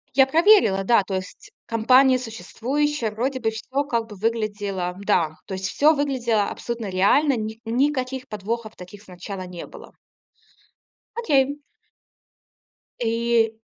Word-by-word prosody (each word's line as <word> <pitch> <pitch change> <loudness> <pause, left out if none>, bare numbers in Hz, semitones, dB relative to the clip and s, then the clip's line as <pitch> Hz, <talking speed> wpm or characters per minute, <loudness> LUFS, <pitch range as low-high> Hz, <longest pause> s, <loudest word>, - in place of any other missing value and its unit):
Я 270 0 +6
проверила, 320 - +4
да. 230 +1 +4
То 195 - -5
есть 185 0 -7
компания 255 +3 +4
существующая, 255 +2 -2
вроде 255 +5 -2
бы 225 -2 0
всё, 260 +6 -3
как 235 -5 -1
бы 210 - -10
выглядело 205 -4 -2
Да, 160 -6 +1
То 190 - -5
есть 190 0 -3
всё 305 +8 +4
выглядело 250 -7 0
абсолютно 235 -2 -5
реально, 220 +10 +3
ни 220 +1 -5
никаких 260 +2 -1
подвохов 220 +1 -4
таких 185 +3 -12
сначала 190 0 -8
не 180 -1 -8
было. - - -13 1.2
Окей. 285 - +1 1.4
И 230 -1 +1
230 Hz, 125 wpm, -23 LUFS, 205-265 Hz, 1.4 s, Я